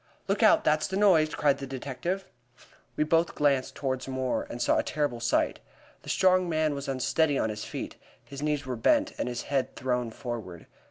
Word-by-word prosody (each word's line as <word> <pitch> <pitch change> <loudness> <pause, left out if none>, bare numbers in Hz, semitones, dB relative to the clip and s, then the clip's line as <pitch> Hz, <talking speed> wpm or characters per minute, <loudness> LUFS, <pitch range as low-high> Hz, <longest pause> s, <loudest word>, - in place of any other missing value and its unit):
"Look - - 0
out! - - +6
That's 155 0 +2
the 190 - -3
noise," 160 -7 +4
cried 145 -2 +2
the 135 - -6
detective. 135 +8 -4 0.7
We - - +2
both 165 +2 +1
glanced 140 -3 +1
toward 130 -2 -3
Moore, 130 -1 -2
and 120 - -6
saw - - +2
a - - +1
terrible 145 -5 -1
sight. 120 0 +1 0.4
The - - -11
strong 185 -1 +3
man 155 -2 +1
was 140 0 -5
unsteady 140 +3 +1
on 110 - 0
his 105 0 -6
feet, - - -6 0.3
his 140 0 -9
knees 150 -2 -1
were 130 -1 -3
bent, 295 - +2
and - - -1
his 120 0 -4
head 135 -2 -1
thrown 125 -2 -1
forward. 110 -8 -7
140 Hz, 195 wpm, -28 LUFS, 125-155 Hz, 0.7 s, out